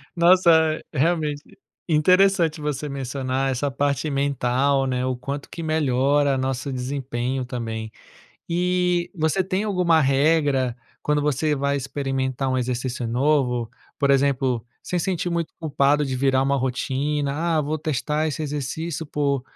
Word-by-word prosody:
Nossa, 170 -3 +4
realmente 150 0 0 0.4
interessante 170 0 +3
você 150 0 -3
mencionar 135 0 -2
essa 140 +3 -1
parte 140 +2 -1
mental, 140 -1 +1
né, 125 0 -1
o 130 -1 -1
quanto 140 +3 -6
que 170 - -7
melhora 145 -2 +2
nosso 130 +1 -2
desempenho 130 0 -3
também. 115 -3 -5 0.6
E 180 0 +1
você 160 +3 +1
tem 190 +3 -1
alguma 180 -5 +3
regra 135 -3 +2 0.3
quando 150 0 +1
você 150 +1 +1
vai 140 0 0
experimentar 135 -1 -2
um 130 - 0
exercício 125 0 -2
novo? 125 -2 +1 0.3
Por 140 -1 +2
exemplo, 135 -4 +2 0.2
sem 180 - -2
sentir 175 -1 -1
muito 170 -1 -2
culpado 145 -1 +2
de 130 - -2
virar 135 0 +2
uma 140 +1 +1
rotina 140 +5 -1
"Ah, - - +4
vou 150 +2 -2
testar 155 +1 -1
esse 155 +1 -4
exercício 150 +3 -3
por 140 -3 -1
140 Hz, 135 wpm, -23 LUFS, 130-155 Hz, 0.6 s, Nossa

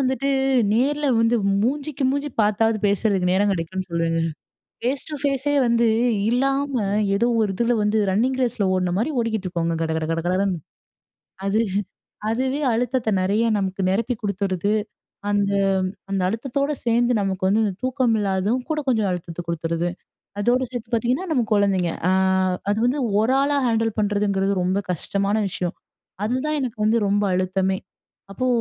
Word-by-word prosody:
வந்துட்டு 265 +1 0 0.4
நேர்ல 290 +5 +1
வந்து 230 +1 +3 0.3
மூஞ்சிக்கு 280 +2 -1
மூஞ்சி 285 +2 -1
பாத்தாவது 215 +1 +2
பேசுறதுக்கு 200 -3 +1
நேரம் 200 +2 +2
கிடைக்கும்னு 185 +1 -3
சொல்லுவேங்க. 165 0 0 0.6
ஃபேஸ் 260 +3 -1
டூ 300 - -4
ஃபேஸே 285 0 0
வந்து 235 0 +3 0.4
இல்லாம 270 -1 +1 0.3
ஏதோ 235 +4 +2
ஒரு 210 -3 +1
இதில 235 +3 +1
வந்து 210 +1 +1
ரன்னிங் 240 +7 +1
ரேஸில 225 -5 0
ஓடுன 180 -1 0
மாரி 230 +9 0
ஓடிக்கிட்ருக்கோங்க 185 -7 -1
கட 160 -1 -1
கட 160 - -2
கட 165 0 -1
கடன்னு. 185 -1 0 0.9
அது 210 +3 +2 0.7
அதுவே 260 +5 -1
அழுத்தத்தை 245 0 0
நெறைய 205 +5 +1
நமக்கு 190 0 -2
நிரப்பி 230 +5 0
குடுத்துருது. 200 -1 -1 0.6
அந்த 200 -1 +1 0.6
அந்த 195 -1 0
அழுத்தத்தோட 270 +7 -1
சேந்து 240 +1 +2
நமக்கு 195 -1 -2
வந்து 215 +3 +3
இந்த 200 - -2
தூக்கம் 255 -2 +1
இல்லாததும் 200 +4 0
கூட 310 - 0
கொஞ்சம் 220 -5 +2
அழுத்தத்த 175 -1 -5
குடுத்துருது. 170 +1 -1 0.5
அதோட 240 +5 +2
சேர்த்து 240 -2 -7
பாத்தீங்கன்னா 250 +10 0
நம்ம 255 - +2
குழந்தைங்க. 195 -4 +2 0.2
அ - - +4 0.6
அது 205 - +1
வந்து 260 +4 +1 0.2
ஒரு 225 +4 +2
ஆளா 285 +1 +1
ஹேண்டில் 225 -1 0
பண்றதுங்கிறது 200 -1 +1
ரொம்ப 185 +2 +1
கஷ்டமான 200 +4 -1
விஷயம். 180 -1 -3 0.5
அதுதான் 260 +7 -1
எனக்கு 245 -5 -4
வந்து 220 +2 +3
ரொம்ப 205 +1 +2
அழுத்தமே! 190 +1 0 0.5
அப்போ, 255 +6 -2
215 Hz, 145 wpm, -22 LUFS, 190-250 Hz, 0.9 s, அ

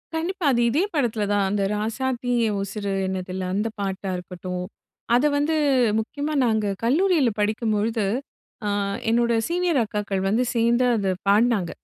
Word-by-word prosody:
கண்டிப்பா. 345 +2 -2
அது 240 -2 +2
இதே 295 +10 +2
படத்துலதான். 210 -7 +1
அந்த 200 0 0
ராசாத்தி 245 +3 -2 0.2
என் 210 -2 -1
உசுரு 200 0 -4 0.2
என்னதில்ல, 185 0 -4
அந்த 210 +3 0
பாட்டா 195 -1 -3
இருக்கட்டும். 180 0 -6 0.5
அத 250 +4 +3
வந்து 300 +2 +1 0.4
முக்கியமா 285 +7 -3
நாங்க 220 -2 +1 0.2
கல்லூரில 305 +2 +3
படிக்கும் 215 +2 0
பொழுது, 220 +1 0 0.6
அ, - - +1 0.4
என்னோட 235 0 +2
சீனியர் 345 -3 +1
அக்காக்கள் 205 -2 -2
வந்து 225 +5 +2
சேர்ந்து 235 +2 +3
அத 195 -3 0
பாடுனாங்க. 205 -3 +3
220 Hz, 135 wpm, -24 LUFS, 200-255 Hz, 0.6 s, அத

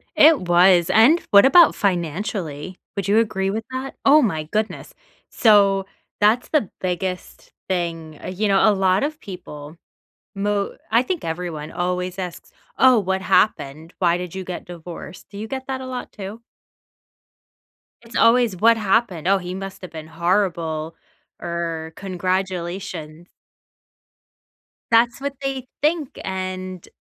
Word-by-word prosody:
It 310 -1 +6
was. 175 0 +5
And 265 +11 +5
what 200 +1 +8
about 340 +4 +7
financially? 180 -2 -2 0.2
Would 200 -2 -3
you 210 +3 +4
agree 195 -4 0
with 220 +3 -3
that? 260 +1 -5
Oh, 295 +2 +7
my 160 - 0
goodness. 215 +8 -3 0.4
So, 200 -3 +4 0.3
that's 215 +4 +3
the 295 - +1
biggest 180 0 -4 0.2
thing. 165 -4 -3
You 205 +3 -1
know, 195 +2 +4
a - - +3
lot 190 +1 +2
of 305 +1 -3
people 165 - -10 0.6
mo 200 0 -1
I 230 +2 +4
think 355 +3 -3
everyone 160 -2 -5
always 180 +1 -3
asks, 180 -2 -6 0.3
"Oh, 255 -1 +6
what 190 -1 -1
happened? 165 -5 0
Why 175 -2 +3
did 180 0 -6
you 190 - -4
get 180 -1 -6
divorced?" 175 0 -10
Do 200 - -9
you 215 - -5
get 260 +2 -6
that 265 -1 -3
a 260 - -7
lot 255 -1 -6
too? 205 +3 -8 1.6
It's 230 0 -14
always, 230 -3 +4
"What 230 +5 +4
happened? 195 -5 0
Oh, 195 0 +4
he 180 0 -6
must 195 0 -7
have 185 - -9
been 155 -1 -8
horrible," 165 -2 -1 0.4
or 165 -2 -4
"congratulation." 185 -3 -4 1.6
That's 235 +2 +4
what 280 0 -3
they 270 -2 -3
think. 305 -2 0
And, 185 -1 -5
190 Hz, 140 wpm, -21 LUFS, 175-225 Hz, 1.6 s, what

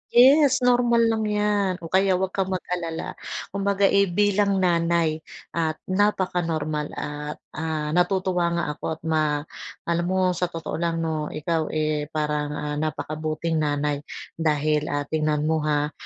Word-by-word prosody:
Yes 270 +1 +6
normal 240 -1 +4
lang 220 -1 0
'yan, 210 -2 +1
o 165 - -7
kaya 190 0 +4
'wag 190 0 -1
kang 190 -1 -1
mag-alala. 175 -3 -3 0.4
Kumbaga 200 0 0
eh, 200 0 +4
bilang 205 +2 +2
nanay 170 -3 +2 0.3
at 160 -2 0
napakanormal 175 -6 0
at 150 0 -5 0.2
ah, 155 -1 -3
natutuwa 180 -1 +1
nga 170 - 0
ako - - -8
at - - -24
ma 160 -1 +1 0.6
alam 170 0 0
mo 185 0 +2
sa 180 0 -1
totoo 165 -1 -5
lang 165 -1 -1
no, 155 -2 -2
ikaw 160 +1 -1
eh, 155 -1 -1
parang 150 -1 -2
ah, 150 0 -3
napakabuting 155 +1 -2
nanay 145 -1 0 0.4
dahil, 150 -1 +1
ah, 145 0 -1
tingnan 150 0 0
mo 160 0 +1
ha 150 0 +1
165 Hz, 145 wpm, -24 LUFS, 155-190 Hz, 0.6 s, Yes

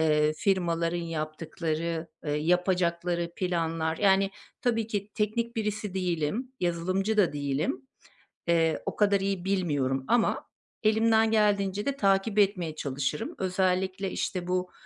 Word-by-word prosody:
ııı, 150 -1 +3
firmaların 170 -4 +1
yaptıkları, 165 0 -3 0.2
ııı, 145 0 0
yapacakları 175 +1 +1
planlar. 165 -3 -1
Yani, 195 -1 +4 0.3
tabii 230 -3 +1
ki 205 -2 -3
teknik 230 +3 -1
birisi 210 -2 -2
değilim. 185 - -1
Yazılımcı 185 +5 0
da 200 -7 +4
değilim. 140 -2 -2 0.6
Eee, 165 -2 +2
o - - -3
kadar 200 -1 +3
iyi 195 -2 -2
bilmiyorum 145 -9 0
ama 240 -1 +2 0.4
elimden 220 +1 +4
geldiğince 205 -2 +2
de 280 - 0
takip 200 0 +2
etmeye 185 -6 +2
çalışırım. 140 0 -3
Özellikle, 185 0 0
işte, 180 -2 -3
bu, 180 0 -1
180 Hz, 120 wpm, -28 LUFS, 165-200 Hz, 0.6 s, Yani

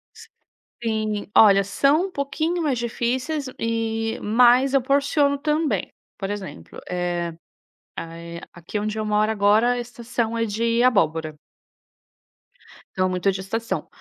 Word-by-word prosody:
S - - -14 0.5
sim 215 -2 -2
olha, 200 -2 +7
são 285 - +2
um 380 - -13
pouquinho 315 +4 -2
mais 270 -6 0
difíceis 255 +5 -2
e 225 0 -1
mas 250 +5 +4
eu 275 - +4
porciono 280 +2 +2
também. 300 - 0 0.3
Por 195 -1 -3
exemplo, 205 -2 -7
eh 175 -1 -2 0.6
a 165 0 -6
eh, 170 0 -8
aqui 175 +4 -5
onde 215 +1 -3
eu 215 - -1
moro 210 +1 +2
agora 215 +3 +3
a 245 - -1
estação 235 -1 -3
é 230 - +1
de 230 +3 0
abóbora. 160 -10 +2 1.6
Então 185 0 +1
muito 185 +1 -2
é - - +4
de 190 - -5
estação. 225 +4 -3
225 Hz, 140 wpm, -23 LUFS, 200-255 Hz, 1.6 s, olha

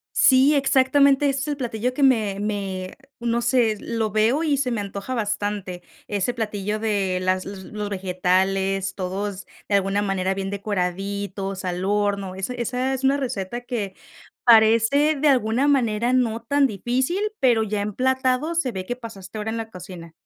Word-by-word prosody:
Sí, 270 +2 +5
exactamente, 275 +1 +4
ese 275 0 0
es 280 - -3
el 290 - -1
platillo 245 -1 -2
que 285 - -2
me 215 -7 +3
me, 195 -3 -3 0.2
no 235 0 0
sé, 235 -3 +2
lo 225 -2 -2
veo 225 - +2
y 295 -3 +2
se 260 -2 -1
me 230 - -1
antoja 200 +5 -5
bastante. 205 -4 -3 0.3
Ese 205 +4 -1
platillo 210 -2 -3
de 200 -4 0
las 185 0 0
los 195 -1 -8
los 210 -1 -5
vegetales, 190 +1 0
todos, 195 +1 -4 0.2
de 200 - +3
alguna 195 +1 +1
manera, 195 -1 0
bien 195 0 -3
decoraditos, 195 0 -3
al 180 0 -2
horno, 200 -1 0
esa 195 +6 -4
esa 250 +2 -1
es 265 0 -3
una 275 +1 +3
receta 240 -4 -3
que 220 -6 -4 0.5
parece, 230 +6 +5
de 300 +1 +1
alguna 255 0 +2
manera, 240 -4 +2
no 235 -3 +1
tan 280 +4 +3
difícil, 255 - -1 0.2
pero 240 -4 +3
ya 210 -1 -2
emplatado, 260 - 0
se 265 -7 0
ve 185 -2 -5
que 245 - -3
pasaste 215 -4 -9
hora 215 +1 -3
en 230 - -3
la 225 0 -5
cocina. 180 -3 -10
215 Hz, 170 wpm, -23 LUFS, 195-255 Hz, 0.5 s, Sí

